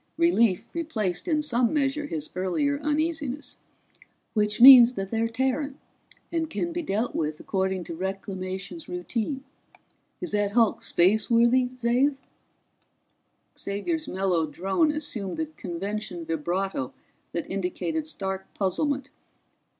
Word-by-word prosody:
Relief 235 - +3
replaced 225 - -2
in 305 -3 +1
some 245 -4 +2
measure 290 0 0
his 155 - -4
earlier 280 +11 0
uneasiness. 300 -2 -2 0.8
"Which 210 0 +1
means 250 -1 +11
that 195 -4 -4
they're 225 +1 0
Terran, 265 +4 -1 0.5
and 325 -2 -1
can 340 +1 -2
be 345 - -2
dealt 225 - -1
with 155 -1 -2
according 190 -1 -1
to 170 - -7
Reclamations 190 - -5
routine. 225 +9 -3 0.8
Is 355 - -4
that 205 -1 0
hulk 230 -2 +3
spaceworthy, 235 +7 +3
Xav?" 250 +4 +2 1.4
Xavier's 310 +12 -3
mellow 185 -4 0
drone 190 - +1
assumed 265 -11 -3
the 320 - 0
convention 195 - -5
vibrato 165 -2 -2 0.4
that 170 - -3
indicated 195 - -2
stark 190 -9 -4
puzzlement. 275 +8 -1
230 Hz, 115 wpm, -26 LUFS, 190-290 Hz, 1.4 s, means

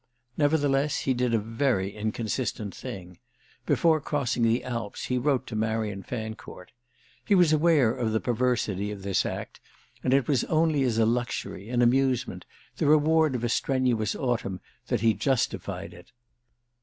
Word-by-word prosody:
Nevertheless 145 -1 +1
he 135 - +1
did 125 -1 0
a 115 - +3
very 110 -3 -1
inconsistent 110 0 -3
thing: 90 -2 -8 0.5
before 160 -2 +3
crossing 140 -5 -1
the 115 +1 +2
Alps 115 -5 -4
he 125 0 0
wrote 135 0 +1
to 115 - -7
Marian 110 -2 -1
Fancourt. 110 -3 -7 0.5
He 200 - +3
was 175 -4 +5
aware 150 -7 +4
of 115 -3 -2
the 110 - +1
perversity 115 -5 0
of 100 -2 -7
this 100 -1 0
act, - - -6 0.4
and 130 - +1
it 135 -2 +3
was 135 -5 +2
only 155 -2 +2
as 125 -4 +1
a 115 - +4
luxury, 115 -3 -2
an 120 0 +2
amusement, 130 -5 +1 0.3
the - - 0
reward 155 -1 +4
of 120 - -3
a 120 - 0
strenuous 120 -5 0
autumn, 120 -7 -2 0.3
that 120 -5 0
he 115 -1 +4
justified 135 +1 -2
it. 90 0 -15
120 Hz, 155 wpm, -27 LUFS, 110-135 Hz, 0.5 s, was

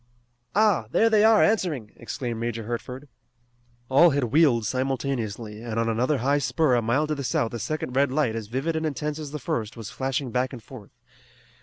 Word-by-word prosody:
"Ah, 205 - +3
there 225 - +3
they 215 -1 +5
are 220 -1 +6
answering!" 160 - 0
exclaimed 120 -5 -5
Major 115 -1 -3
Hertford. 125 +5 -6 0.8
All 140 +7 +6
had 140 -2 0
wheeled 120 -3 +3
simultaneously, 120 -4 -3
and 115 -1 -3
on 115 - +1
another 125 +6 +1
high 140 +4 +1
spur 130 +2 +1
a 120 - +3
mile 120 +7 +1
to 155 - -2
the 140 -2 -4
south 115 -2 0
a 120 - -4
second 155 -1 -4
red 140 -1 +3
light 135 -5 +1
as 110 -2 -5
vivid 135 +8 -2
and 160 - -1
intense 150 +1 -3
as 150 -2 -6
the 150 - -5
first 115 -4 -3
was 110 -2 -7
flashing 135 -1 -2
back 125 +2 -1
and 120 -4 -9
forth. 110 -3 -12
130 Hz, 195 wpm, -25 LUFS, 115-150 Hz, 0.8 s, are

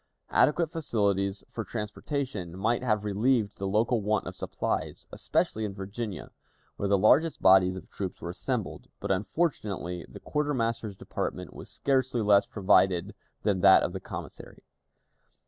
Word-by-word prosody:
Adequate 165 +1 +3
facilities 100 - 0
for 115 - -4
transportation 105 - -4
might 115 +5 +1
have 110 -4 0
relieved 105 +1 +1
the 100 - -2
local 110 +3 +2
want 105 +1 0
of - - -5
supplies, - - -3
especially 110 - -1
in 100 -2 -4
Virginia, 100 -1 -6 0.4
where 100 - -2
the 100 - +4
largest 150 - +4
bodies 95 -1 +5
of 95 - -9
troops 95 -2 -5
were 85 - -5
assembled; - - -3
but, - - -2
unfortunately, 95 - -1
the - - -10
quartermaster's 115 -8 -1
department - - -4
was - - -9
scarcely 130 -4 0
less 100 -1 +5
provided 95 -3 +2 0.3
than 100 -3 +1
that 95 -1 +7
of 90 - -2
the 95 - -4
commissary. - - -9
105 Hz, 145 wpm, -28 LUFS, 95-120 Hz, 0.4 s, that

